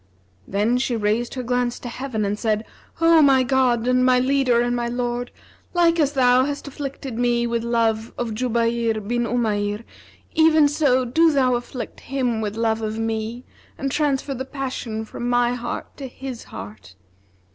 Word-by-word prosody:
Then 215 +5 +1
she 250 -1 0
raised 220 +3 0
her 255 - -3
glance 245 0 0
to - - -8
heaven 240 -3 -3
and 205 +1 -2
said, 220 -1 0 0.3
'O 330 -1 +6
my 270 -3 +5
God 250 -3 +2
and 255 0 +3
my 255 0 +5
Leader 255 -1 +2
and 240 0 +1
my 240 -1 -1
Lord, 245 0 -2 0.5
like 340 -1 +4
as 290 -2 +2
Thou 255 -1 +4
hast 285 0 -4
afflicted 275 -3 -6
me 240 -1 +2
with 235 -1 -1
love 230 -1 0
of 230 -2 -2
Jubayr 230 -1 0
bin 240 +1 0
Umayr, 210 -3 -1 0.5
even 315 -2 +5
so 280 -4 +2
do 320 +7 +4
Thou 260 -3 +3
afflict 240 +1 -5
him 250 -4 -1
with 210 -1 -3
love 225 -1 0
of 215 0 -3
me, 225 +2 -3 0.3
and 275 0 -2
transfer 285 -1 0
the 260 0 -4
passion 255 -5 -4
from 240 +2 -5
my 245 0 +2
heart 240 -1 -5
to 275 - -6
his 255 -1 -8
heart!' 95 -1 -10
245 Hz, 170 wpm, -22 LUFS, 230-265 Hz, 0.5 s, O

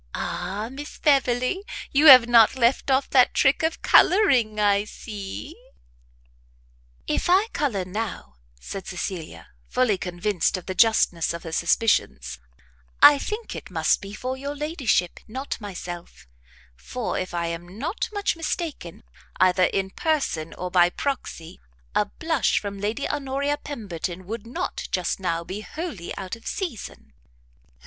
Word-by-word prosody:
Ah, 205 +3 -4
Miss 290 +3 -8
Beverley! 270 +4 +2 0.3
you 295 +3 +5
have 255 -4 +10
not 235 -1 +6
left 255 +2 +2
off 265 +1 +2
that 255 -2 +5
trick 270 - +3
of 320 0 -1
colouring, 255 - +4
I 205 0 +3
see!" 215 - -8 1.5
"If - - -1
I 390 +5 +4
colour 215 -11 -1
now," 180 - -5 0.2
said 190 - -7
Cecilia, 175 -2 -6 0.2
fully 230 -7 +1
convinced 180 +1 -1
of 180 - -9
the 185 - -4
justness 180 -5 +3
of 170 - -8
her 165 - -7
suspicions, 115 - +1 0.6
"I 290 -1 +9
think 435 +8 -5
it - - -8
must - - +1
be 200 +1 -8
for 255 +3 -4
your 280 +2 -5
ladyship, 285 - 0
not 260 +2 -5
myself; 175 -4 -8 0.5
for, 240 - -4
if 185 -1 -5
I 170 0 -1
am 170 +3 -6
not 320 - -3
much 410 -3 -1
mistaken, 325 - -5 0.4
either 185 0 +4
in 190 +1 -1
person, 270 - -1
or 180 0 -5
by 175 -1 +5
proxy, 180 - -5 0.3
a - - +2
blush - - 0
from 200 -1 -6
Lady 215 +8 -2
Honoria 285 0 -1
Pemberton 185 - -6
would 225 +3 -6
not, 240 - -4
just 180 +1 -1
now, 170 -3 -1
be 190 +4 -6
wholly 270 - -6
out 190 +2 -5
of 230 - -13
season." 245 - -6
215 Hz, 140 wpm, -24 LUFS, 180-275 Hz, 1.5 s, have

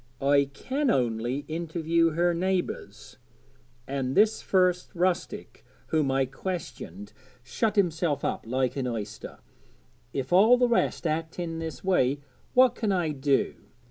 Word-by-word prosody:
I 140 0 +4
can 265 - -2
only 120 - 0
interview 165 0 0
her 175 +2 +2
neighbours; 185 +1 -3 0.7
and 135 -1 -2
this 215 +1 +4
first 180 -2 +2
rustic 180 0 -2 0.3
whom 155 -3 +1
I 135 0 +2
questioned 125 - -6 0.3
shut 210 - -1
himself 165 -6 +1
up - - -2
like 130 +1 0
an 135 -2 -2
oyster; 110 -3 -6 0.7
if 135 +3 -3
all 220 +7 +7
the 245 0 +3
rest 235 -6 0
act 160 +1 -2
in 165 -2 -4
this 160 -4 -6
way, 145 -8 +2 0.4
what 255 -1 +6
can 220 -4 -1
I 175 -4 +1
do? 140 -1 +1
160 Hz, 135 wpm, -27 LUFS, 135-185 Hz, 0.7 s, all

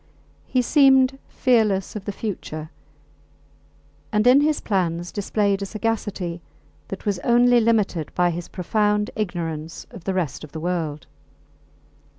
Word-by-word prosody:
He 255 -1 +1
seemed 270 -1 +4
fearless 220 -7 +1
of 210 - -6
the 205 - -2
future, 160 -7 -5 1.4
and 210 +1 +2
in 255 +3 +7
his 300 0 +2
plans 175 -4 -1
displayed 200 -1 0
a - - -1
sagacity 205 -6 -3 0.5
that 195 - -7
was 200 -3 0
only 245 +4 +4
limited 215 -8 +1
by 175 -1 +3
his 170 +1 -5
profound 210 +3 0
ignorance 165 -6 -4
of 170 - -11
the 190 - -1
rest 170 -7 -2
of 155 - -11
the 160 - -5
world. 160 -4 -3
200 Hz, 135 wpm, -23 LUFS, 175-225 Hz, 1.4 s, in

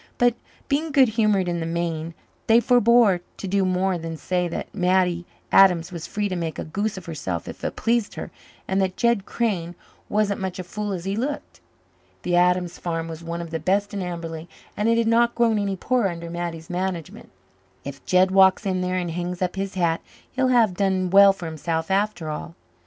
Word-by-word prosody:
But, 245 0 +4 0.3
being 300 +3 0
good 270 -3 +5
humoured 210 -4 +2
in 175 -1 -1
the 165 - -3
main, 165 -1 -3 0.3
they 225 +1 +6
forebore 235 -6 +4 0.2
to 195 - -5
do 195 +1 +1
more 185 0 0
than 165 0 -5
say 180 +2 -1
that 170 - -6
Mattie 180 -2 +1 0.2
Adams 180 -3 +5
was 170 -3 -6
free 205 0 -2
to 185 - -3
make 165 -2 -3
a - - -3
goose 200 +6 -2
of 185 - -8
herself 145 - -4
if - - -9
it - - -3
pleased 230 -2 0
her, - - -6 0.4
and 190 +1 +1
that 185 -1 -1
Jed 235 -4 +1
Crane 180 -7 -2 0.3
wasn't 205 -1 0
such 190 -1 -3
a 185 - -4
fool 210 +3 -4
as 180 -2 -4
he 195 +1 -1
looked. 275 +6 -4 0.6
The 175 - 0
Adams 180 0 +2
farm 165 -1 -3
was 165 0 -8
one 170 +1 -4
of 170 -1 -8
the 165 - -2
best 200 +5 0
in 200 - -3
Amberley, 170 -2 -5 0.3
and 210 +2 +1
it 230 - +3
had 230 - +2
not 235 +1 +3
grown 230 -2 +2
any 200 -1 -1
poorer 235 +2 +1
under 170 -1 -7
Mattie's 170 -2 -5
management. 180 -3 -4 0.6
"If 140 0 -8
Jed 185 +1 +3
walks 190 +2 +5
in 185 -2 0
there 180 0 -1
and 175 -2 -2
hangs 175 +1 -4
up 180 0 -1
his 195 0 -4
hat 170 -3 +1 0.3
he'll 260 0 +1
have 235 -6 +4
done 185 -1 0
well 200 0 +8
for 195 -3 -8
himself 160 +2 -3
after 195 -4 0
all." 155 +2 -5
185 Hz, 205 wpm, -23 LUFS, 170-205 Hz, 0.6 s, well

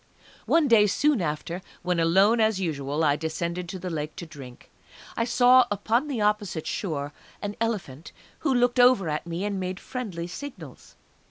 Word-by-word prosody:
One 330 -3 +4
day 220 -4 +6
soon 280 +3 +2
after, 170 +3 -3 0.2
when 180 -1 0
alone 190 +8 +4
as 220 -3 +2
usual 150 -3 -2
I 145 -2 +3
descended 170 +3 -3
to 185 - -5
the 180 0 -5
Lake 150 -1 -4
to 170 - -7
drink, 135 -6 -12 0.4
I 230 - 0
saw 250 +1 +5
upon 225 +7 0
the 260 -7 -2
opposite 210 -6 0
shore 150 -6 -3 0.3
an 205 0 -5
elephant 175 - -3 0.3
who - - 0
looked 245 0 +2
over 245 -8 +5
at 150 +2 -3
me 170 +4 -3
and 200 -2 -2
made 185 +1 -4
friendly 200 -10 -5
signals. 180 - -10
185 Hz, 170 wpm, -26 LUFS, 160-230 Hz, 0.4 s, day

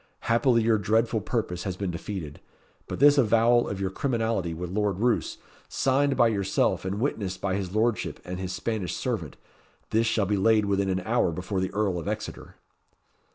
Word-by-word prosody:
Happily 115 0 +3
your 110 -1 +3
dreadful 110 +2 +1
purpose 105 -8 -2
has 95 -2 -4
been 95 -2 -2
defeated; 85 -3 -6 0.5
but - - -4
this 145 +1 +6
avowal 120 0 +4
of 100 - -4
your 95 -1 -2
criminality 115 -7 -1
with 85 +2 -5
Lord 100 -1 0
Roos, 120 +1 0 0.3
signed 135 +1 +1
by 120 - +5
yourself 100 -3 0
and 95 +2 -2
witnessed 100 -8 -2
by 95 -1 -1
his 95 0 -3
lordship 110 -2 0
and 90 +1 -5
his 95 -1 -4
Spanish 100 0 -3
servant, - - -3 0.5
this 115 +1 +2
shall 110 -2 +1
be 100 +1 0
laid 105 +2 +3
within 100 -1 0
an 95 0 0
hour 110 -1 +1
before 95 +4 -3
the 95 0 -2
Earl 100 -4 0
of 80 - -7
Exeter." - - -5
105 Hz, 180 wpm, -26 LUFS, 95-115 Hz, 0.5 s, this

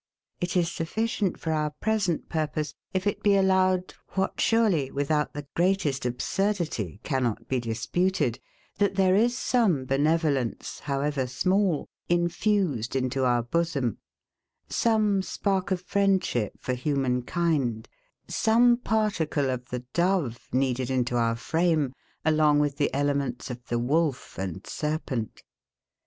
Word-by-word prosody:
It 175 +1 -1
is 170 -1 +2
sufficient 200 +4 -1
for 160 - -2
our 155 -1 +1
present 210 -7 0
purpose, 155 -2 -2 0.2
if 185 +1 -1
it 205 - -1
be 205 -1 +4
allowed, 185 -1 +2 0.2
what 190 0 -1
surely, 205 - +3
without 145 +2 -1
the 145 0 -5
greatest 170 -8 +1
absurdity 150 - -1
cannot 130 -6 -1
be 130 - 0
disputed, 120 +5 0 0.4
that 200 -1 +2
there 190 -1 +4
is 235 +5 +3
some 205 - +2
benevolence, 145 -2 0
however 140 -1 -1
small, 185 +6 +1 0.2
infused 175 - +1
into 130 0 0
our 120 -1 +2
bosom; 140 -3 -1 0.7
some 215 -4 +2
spark 190 0 -1
of 185 -2 0
friendship 190 - +1
for 130 - -2
human 125 -1 0
kind; 135 -7 0 0.4
some 240 +2 +4
particle 200 - 0
of 125 0 -5
the 125 0 -5
dove 170 -9 0
kneaded 130 -1 0
into 125 -2 0
our 115 -1 +2
frame, 160 +1 +1 0.3
along 155 -2 +4
with 145 -1 +1
the 145 - +1
elements 140 -3 -1
of 120 0 -9
the 120 - 0
wolf 140 +3 0
and 95 0 -4
serpent. 150 -7 -3
155 Hz, 130 wpm, -27 LUFS, 130-185 Hz, 0.7 s, be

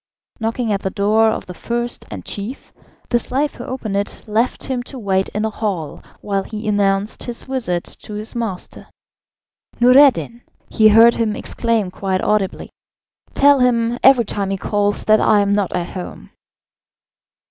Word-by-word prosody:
Knocking 225 0 -1
at 200 - -2
the 190 - -2
door 215 +3 +2
of - - -3
the 180 - -8
first 240 +5 -4
and 95 -4 -8
chief, 210 +7 -7 0.4
the 240 - +3
slave 275 +5 -1
who - - -9
opened 230 -6 -4
it 200 0 -3
left 225 +4 -1
him 255 -2 -2
to 260 +2 -9
wait 195 -4 0
in 210 +1 -2
a 220 - -2
hall 190 -9 -4 0.2
while 200 -1 -1
he 215 +2 -7
announced 200 0 0
his 240 -1 -6
visit 230 -10 -2
to 210 - -10
his 215 +1 -6
master. 225 -6 -5 0.9
"Noureddin!" 250 -1 +5 0.3
he 220 - +5
heard 225 +2 +7
him 220 -2 -1
exclaim 225 -6 -1
quite 190 0 -2
audibly. 210 -3 -1 0.6
"Tell 285 0 +5
him, 240 -1 +1
every 260 -3 +6
time 200 -1 -2
he 195 - -1
calls, 205 +1 -1
that 215 0 +4
I 210 -1 +4
am 200 0 +1
not 200 -3 0
at 175 -1 -2
home." 180 -2 -8
215 Hz, 165 wpm, -19 LUFS, 200-235 Hz, 0.9 s, heard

